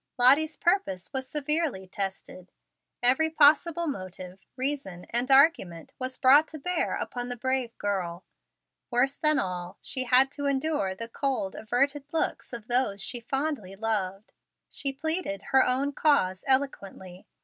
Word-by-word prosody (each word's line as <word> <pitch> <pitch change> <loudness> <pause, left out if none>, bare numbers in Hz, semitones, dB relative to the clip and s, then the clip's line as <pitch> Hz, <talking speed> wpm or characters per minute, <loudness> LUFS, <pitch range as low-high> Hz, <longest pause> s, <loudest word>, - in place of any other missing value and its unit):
Lottie's 285 +6 +4
purpose 345 - 0
was 260 -1 -4
severely 300 - -1
tested. 190 -1 -6 0.5
Every 265 +6 +4
possible 320 +2 +4
motive, 185 - -6 0.2
reason, 255 -10 -4
and 240 +3 0
argument 265 - +3
was 255 0 -3
brought 285 +4 +6
to 315 - -8
bear 360 +5 -1
upon 245 0 -5
the 245 - -3
brave 255 -1 -2
girl. 185 -4 -3 0.6
Worse 265 +3 +1
than 305 -1 +2
all, 180 0 -3
she 260 -1 -3
had 260 +2 +4
to 285 -1 -4
endure 270 -8 -1
the 230 +3 -6
cold, 250 -5 -2
averted 275 +6 -1
looks 325 - -2
of 235 -3 -7
those 240 -5 0
she 240 +6 -2
fondly 270 -5 -3
loved. 200 -2 -3 0.4
She 275 - -2
pleaded 315 - -3
her 265 - +7
own 270 +3 +1
cause 190 -13 +2
eloquently. 200 -9 -1
255 Hz, 140 wpm, -27 LUFS, 195-285 Hz, 0.6 s, her